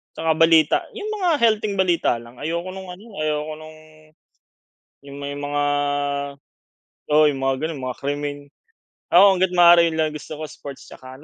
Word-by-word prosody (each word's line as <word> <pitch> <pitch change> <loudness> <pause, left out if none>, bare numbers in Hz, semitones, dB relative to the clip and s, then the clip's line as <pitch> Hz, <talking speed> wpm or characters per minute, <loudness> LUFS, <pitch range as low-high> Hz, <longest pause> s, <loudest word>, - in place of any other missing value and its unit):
'tsaka 160 0 0
balita. 160 -2 +5 0.2
'Yong 430 -1 -5
mga 365 -2 +1
healthing 215 -2 +2
balita 180 -8 +1
lang, 120 +1 -12
ayoko 170 +4 -3
no'ng 190 0 -9
ano, 200 +5 -17
ayoko 155 0 -2
no'ng, 155 0 -12 1.3
'yong 140 0 -10
may 140 0 -5
mga 145 0 -2 1.5
oo, 155 - +6
'yong 135 - -6
mga 135 0 0
gano'n 160 -2 -3
mga 130 -1 -5
krimen. 145 0 -3 0.8
Ako, 180 - +9
hangga't 185 0 +1
maaari 175 -1 +7
'yon 165 - -3
lang 160 -1 0
gusto 150 0 -10
ko 155 - -7
sports 140 -1 -10
'tsaka 130 +2 -12
155 Hz, 160 wpm, -21 LUFS, 145-175 Hz, 1.5 s, Ako